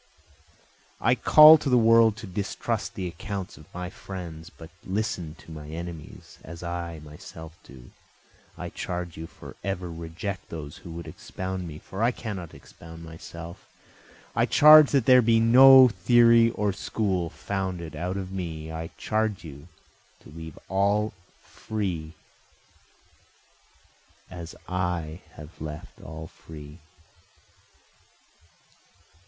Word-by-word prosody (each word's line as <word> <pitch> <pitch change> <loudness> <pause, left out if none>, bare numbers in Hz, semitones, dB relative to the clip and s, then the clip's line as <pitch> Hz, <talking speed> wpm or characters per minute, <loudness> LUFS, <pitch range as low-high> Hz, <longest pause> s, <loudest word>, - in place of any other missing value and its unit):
I 120 - +3
call 155 +5 +8
to 145 - -2
the 125 - +5
world 115 -1 +5
to 110 - -8
distrust 105 +4 -3
the 95 -4 -3
accounts 95 +2 -6
of - - -17
my 90 0 -6
friends, 85 -4 -8
but 80 -2 -14
listen 95 -5 -3
to 80 - -15
my 75 -2 -9
enemies, 85 -1 -9
as 85 +2 -10
I 85 -1 -5
myself 80 +2 -11
do, 65 -2 -15 0.7
I - - -6
charge 90 -2 -5
you 80 +1 -7
forever 90 -1 -6
reject 85 +4 -6
those 75 -3 -8
who - - -12
would 85 +1 -8
expound 95 -1 -6
me, 75 -2 -8
for 95 +5 -8
I 115 - +4
cannot 100 -9 -6
expound 80 0 -13
myself, 85 +2 -10 0.7
I - - +2
charge 155 -1 +8
that 135 -5 +2
there 125 -1 +7
be 115 -1 +3
no 130 +3 +8
theory 115 0 +5
or 105 -3 -1
school 95 -3 -2
founded 95 -4 -4
out 90 +2 -3
of 95 -1 -5
me, 80 -4 -5
I 80 +1 -5
charge 110 -3 -1
you 75 -1 -11 0.5
to - - -16
leave 80 -1 -10
all 100 +3 +1 0.3
free, 90 -8 -5 2.2
as 85 -2 -8
I 90 -3 -3
have 75 +2 -13
left 75 0 -8
all 80 0 -8
free. 75 0 -12
90 Hz, 125 wpm, -26 LUFS, 80-110 Hz, 2.2 s, call